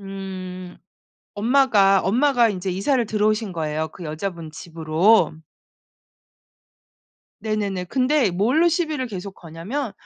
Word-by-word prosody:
음 185 Hz, -2 st, -8 dB, 0.6 s
엄마가 210 Hz, -4 st, +4 dB
엄마가 245 Hz, +3 st, +3 dB
인제 190 Hz, -1 st, -4 dB
이사를 235 Hz, +7 st, +1 dB
들어오신 215 Hz, -1 st, 0 dB
거예요 155 Hz, -1 st, -2 dB
그 175 Hz, +3 st, -11 dB
여자분 160 Hz, +1 st, -5 dB
집으로. 165 Hz, +3 st, +2 dB, 2.1 s
네네네. 205 Hz, -4 st, -2 dB
근데 255 Hz, +1 st, +1 dB
뭘로 245 Hz, -, +2 dB
시비를 315 Hz, -6 st, -1 dB
계속 195 Hz, -2 st, -7 dB
거냐면 190 Hz, -, -5 dB
195 Hz, 245 characters per minute, -22 LUFS, 180-235 Hz, 2.1 s, 엄마가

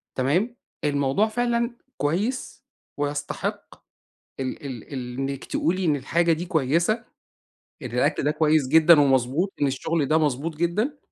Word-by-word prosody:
تمام؟ 175 Hz, -, +1 dB, 0.3 s
الموضوع 145 Hz, +7 st, +2 dB
فعلًا 235 Hz, +1 st, 0 dB, 0.2 s
كويس، 200 Hz, -, -2 dB, 0.3 s
ويستحق 145 Hz, 0 st, -3 dB, 0.6 s
ال 135 Hz, +2 st, -4 dB
ال 130 Hz, 0 st, -7 dB
اللي 125 Hz, -2 st, -5 dB
إنِّك 135 Hz, 0 st, -4 dB
تقولي 185 Hz, +3 st, 0 dB
إن 155 Hz, -3 st, +3 dB
الحاجة 165 Hz, +5 st, +1 dB
دي 165 Hz, +2 st, -3 dB
كويسة. 170 Hz, -, +1 dB, 0.8 s
إن -, -, -5 dB
الأكل -, -, +1 dB
ده 150 Hz, -, +2 dB
كويس 155 Hz, -2 st, +2 dB
جدًا، 160 Hz, +2 st, +7 dB
ومضبوط. 135 Hz, +7 st, +2 dB
إن 145 Hz, -, +4 dB
الشغل 145 Hz, +3 st, -1 dB
ده 155 Hz, -, +3 dB
مضبوط 150 Hz, +1 st, 0 dB
جدًا. 210 Hz, -, 0 dB
155 Hz, 135 wpm, -24 LUFS, 140-180 Hz, 0.8 s, جدًا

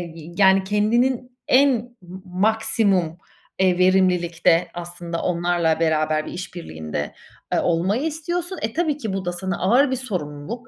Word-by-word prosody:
y 165 Hz, +1 st, -10 dB
yani 195 Hz, -1 st, +5 dB
kendinin 240 Hz, +5 st, 0 dB
en 280 Hz, +2 st, +5 dB, 0.3 s
m 185 Hz, +1 st, -11 dB
maksimum, 195 Hz, -2 st, +1 dB, 0.4 s
eee, 185 Hz, -2 st, +3 dB
verimlilikte 180 Hz, -2 st, +3 dB
aslında 175 Hz, -1 st, -5 dB
onlarla 170 Hz, -2 st, +1 dB
beraber 155 Hz, -1 st, +1 dB
bir -, -, -7 dB
iş 180 Hz, 0 st, -7 dB
birliğinde, 80 Hz, -, -5 dB, 0.4 s
eee, -, -, +3 dB
olmayı 185 Hz, -, +1 dB
istiyorsun. 345 Hz, +4 st, -3 dB
E, 220 Hz, +1 st, -2 dB
tabii 315 Hz, -3 st, 0 dB
ki 220 Hz, -9 st, -4 dB
bu 190 Hz, -1 st, -3 dB
da 175 Hz, -, -1 dB
sana 180 Hz, 0 st, -3 dB
ağır 250 Hz, +8 st, +4 dB
bir -, -, +1 dB
sorumluluk. 200 Hz, -, -5 dB
185 Hz, 145 wpm, -22 LUFS, 170-230 Hz, 0.4 s, yani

